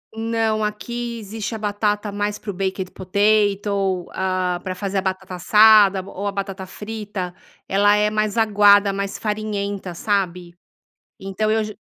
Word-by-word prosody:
Não. 225 -1 0
Aqui 235 +3 -4
existe 220 +1 -5
a - - -3
batata 210 0 -1
mais 205 +1 -2
para 210 - -6
o - - -10
baked 190 0 -3
potato. 200 -1 +1
Ah, 185 -1 -1
pra 185 -1 -4
fazer 200 +1 -3
a - - -2
batata 190 0 -4
assada 210 +1 +6
ou 200 +1 -5
a - - 0
batata 195 -1 -5
frita. 205 -3 -6 0.3
Ela 205 +1 +4
é 210 0 +2
mais 215 0 -1
aguada, 205 -2 +5
mais 200 0 -3
farinhenta, 205 -3 -3
sabe? 180 -3 -2 0.7
Então 195 +3 -2
eu 220 0 +1
j 215 -1 -8
205 Hz, 150 wpm, -21 LUFS, 190-215 Hz, 0.7 s, assada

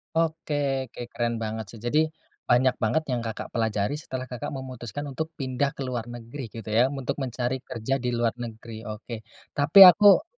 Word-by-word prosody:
Oke 160 -2 0 0.3
oke 120 - -10
keren 120 0 -1
banget 110 0 -3
sih. 115 - -11
Jadi, 145 +6 +3 0.5
banyak 125 +1 +4
banget 155 +9 +2
yang 125 - 0
Kakak 115 -1 -5
pelajari, 110 0 0
setelah 130 -3 -5
Kakak 125 +3 -5
memutuskan 130 -1 -6
untuk 155 +4 -3
pindah 135 0 -1
ke 140 - -4
luar 125 -3 -3
negeri, 120 +2 -7
gitu 110 -2 -7
ya, 115 +4 +4
untuk 135 0 -4
mencari 125 +1 -2
kerja 125 0 -4
di 125 -1 -2
luar 120 -1 +2
negeri? 115 -1 -8
Oke, 110 +2 -6 0.3
tapi 145 +7 +4
aku 200 - +8
125 Hz, 175 wpm, -26 LUFS, 115-135 Hz, 0.5 s, aku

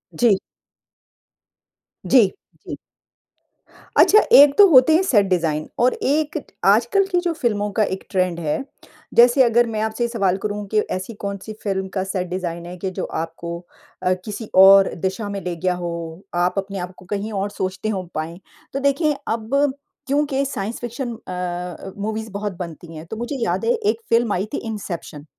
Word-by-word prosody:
जी। 230 -5 +4 1.7
जी, 240 -6 +6 0.4
जी। - - -5 1.2
अच्छा, 430 - +7
एक 285 0 +8
तो 410 - +9
होते 270 +1 +7
हैं 340 - +4
सेट 215 - +3
डिजाइन 165 -5 0
और 250 +1 +4
एक 300 +2 0 0.3
आजकल 235 - +4
की 355 - +3
जो 350 -1 -1
फ़िल्मों 210 -9 -1
का 220 - +4
एक 190 -2 -3
ट्रेंड 185 -2 0
है, 160 - -2 0.5
जैसे 245 +3 +6
अगर 240 0 +4
मैं 220 -2 -3
आपसे 220 +2 -1
ये - - +1
सवाल 200 -6 0
करूँ 210 0 -3
कि 215 - +3
ऐसी 185 +5 -4
कौन-सी 200 +2 -5
फ़िल्म 190 -2 -1
का 190 - -1
सेट 190 -1 -3
डिजाइन 175 -2 -4
है 175 +1 -7
कि 190 +2 -3
जो - - -4
आपको 165 +1 -5 0.5
अ, 185 0 +3
किसी 210 +1 -6
और 195 +1 +8
दिशा 190 +4 -3
में 200 0 -4
ले 180 -2 -4
गया 180 +2 0
हो, 170 -1 -5
आप 175 +1 +2
अपने 195 0 -3
आपको 180 +1 -8
कहीं 205 +3 -3
और 200 0 -1
सोचते 190 +1 -3
हों 190 -4 -2
पाएँ। 160 +3 -4 0.3
तो 275 - -1
देखिए 280 +2 +1
अब 260 +5 0 0.3
क्योंकि 280 0 +1
साइंस 225 -4 -4
फ़िक्शन 240 +1 -4
अ, 180 -2 -6
मूवीज़ 220 +2 -4
बहुत 205 0 -4
बनती 165 -1 -8
हैं। 155 +1 -8
तो 215 - -7
मुझे 240 +5 -4
याद - - -1
है 465 - +3
एक 445 -1 -1
फ़िल्म 230 -2 +3
आई 185 +2 -1
थी - - 0
इंसेप्शन, 175 -8 -6
205 Hz, 175 wpm, -21 LUFS, 180-240 Hz, 1.7 s, तो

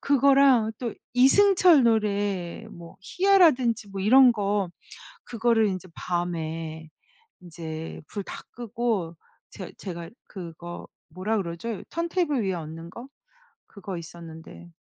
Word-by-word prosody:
그거랑 275 -5 +4
또 235 -3 -3 0.2
이승철 350 +4 +6
노래 205 -4 0
뭐 170 -4 -12
희야라든지 265 - +3
뭐 195 -1 -5
이런 250 +4 +7
거 205 -3 -1 0.6
그거를 230 -1 +2
인제 185 -2 -4
밤에 160 -2 -4 0.5
인제 160 -2 -7
불 205 - -5
다 - - -8
끄고 225 -7 -3 0.3
제 - - -9
제가 170 -3 -7 0.2
그거 175 -2 -9 0.2
뭐라 185 +7 -2
그러죠? 190 +4 -4
턴테이블 335 - -1
위에 190 -1 -1
얹는 165 0 -7
거? 235 +8 -10 0.6
그거 195 -2 -8
있었는데. 165 0 -11
200 Hz, 230 characters per minute, -26 LUFS, 170-240 Hz, 0.6 s, 이런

